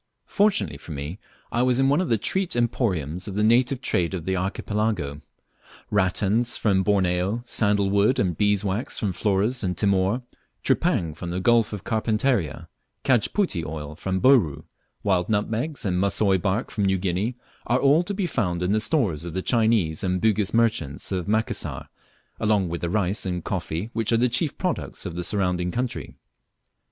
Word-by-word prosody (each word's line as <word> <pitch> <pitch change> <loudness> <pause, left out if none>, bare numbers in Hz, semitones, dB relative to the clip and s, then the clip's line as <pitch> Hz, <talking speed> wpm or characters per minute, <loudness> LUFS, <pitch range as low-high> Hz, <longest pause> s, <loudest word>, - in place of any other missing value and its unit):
Fortunately 185 - +1
for 80 - -8
me 75 +7 -6 0.3
I 120 - +1
was 125 -1 +2
in 135 0 +3
one 145 +5 +3
of 185 - -2
the 115 - +3
treat 190 - -1
emporiums 95 - -1
of 100 - -5
the 105 - +1
native 125 +4 +3
trade 90 -7 0
of 85 -3 -6
the 95 - 0
archipelago. 95 -5 -2 0.7
Rattans 105 +5 +2
from 95 -3 +2
Borneo, 95 +2 +1
sandal 100 -4 +2
wood 100 +5 +3
and 90 -4 +1
bees' 105 +1 +2
was 100 +5 -2
from 100 -4 -1
Flores 105 +7 0
and 90 -1 -1
Timor, 100 +4 +1 0.4
tripang 110 - +1
from 85 +1 -6
the 90 +2 -2
Gulf 115 +2 +3
of 105 -3 -6
Carpentaria, 110 - 0 0.4
cajputi 125 - +1
oil 75 -1 -6
from 95 +3 -2
Bouru, 110 - +4 0.4
wild 95 -2 +1
nutmegs 110 +8 -1
and 90 -2 0
mussoi 100 -1 +2
bark 100 +6 -1
from 100 - 0
New 95 0 +2
Guinea, 95 +6 -1 0.3
are 120 - +3
all 140 +5 +4
to 180 +3 -4
be 195 -1 -1
found 90 - -1
in 90 - 0
the 110 - +3
stores 110 - 0
of 85 -1 -6
the 95 - -2
Chinese 110 -9 +1
and 90 -1 0
Bugis 105 -1 +1
merchants 110 -13 0
of 90 -2 -2
Macassar, 110 +2 -2 0.5
along 105 -5 +1
with 85 0 -4
the 85 - -1
rice 100 +2 0
and 90 -2 -3
coffee 90 +3 -3
which 115 -1 -1
are 115 - +4
the 125 +2 +2
chief 130 +5 -1
products 180 - -3
of 85 -3 -5
the 90 - -3
surrounding 90 -2 +1
country. 125 +4 -4
100 Hz, 175 wpm, -24 LUFS, 90-115 Hz, 0.7 s, Bouru